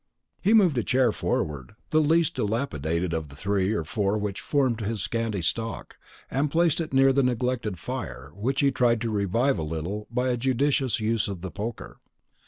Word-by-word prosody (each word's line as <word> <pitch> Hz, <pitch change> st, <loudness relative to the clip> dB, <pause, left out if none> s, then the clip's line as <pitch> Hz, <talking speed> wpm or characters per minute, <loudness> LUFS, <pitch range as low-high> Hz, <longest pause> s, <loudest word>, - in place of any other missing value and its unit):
He 210 Hz, +4 st, +4 dB
moved 180 Hz, -, +4 dB
a -, -, -1 dB
chair 125 Hz, -1 st, +3 dB
forward, 75 Hz, -8 st, -2 dB, 0.2 s
the 155 Hz, -, +4 dB
least 160 Hz, +1 st, +3 dB
dilapidated 90 Hz, -, -1 dB
of 80 Hz, -2 st, -2 dB
the 70 Hz, -, -13 dB
three 95 Hz, +5 st, 0 dB
or 105 Hz, -7 st, 0 dB
four 100 Hz, +5 st, 0 dB
which 105 Hz, -1 st, -3 dB
formed 130 Hz, -6 st, +1 dB
his 110 Hz, 0 st, -2 dB
scanty 115 Hz, -5 st, -2 dB
stock, 115 Hz, +6 st, -3 dB, 0.3 s
and 140 Hz, +4 st, +1 dB
placed 170 Hz, +1 st, +2 dB
it 160 Hz, -, -5 dB
near 135 Hz, 0 st, +5 dB
the 140 Hz, -, +3 dB
neglected 125 Hz, -5 st, -1 dB
fire, 90 Hz, -, -6 dB
which 125 Hz, -, -1 dB
he 140 Hz, -1 st, +4 dB
tried 120 Hz, -3 st, +2 dB
to 115 Hz, -2 st, -1 dB
revive 110 Hz, +7 st, +1 dB
a -, -, -1 dB
little 80 Hz, +7 st, -4 dB
by 125 Hz, +2 st, 0 dB
a 125 Hz, -, +1 dB
judicious 130 Hz, -1 st, +1 dB
use 110 Hz, 0 st, 0 dB
of 95 Hz, -4 st, -5 dB
the 95 Hz, -1 st, -5 dB
poker. 105 Hz, -, -6 dB
115 Hz, 190 wpm, -26 LUFS, 100-130 Hz, 0.3 s, near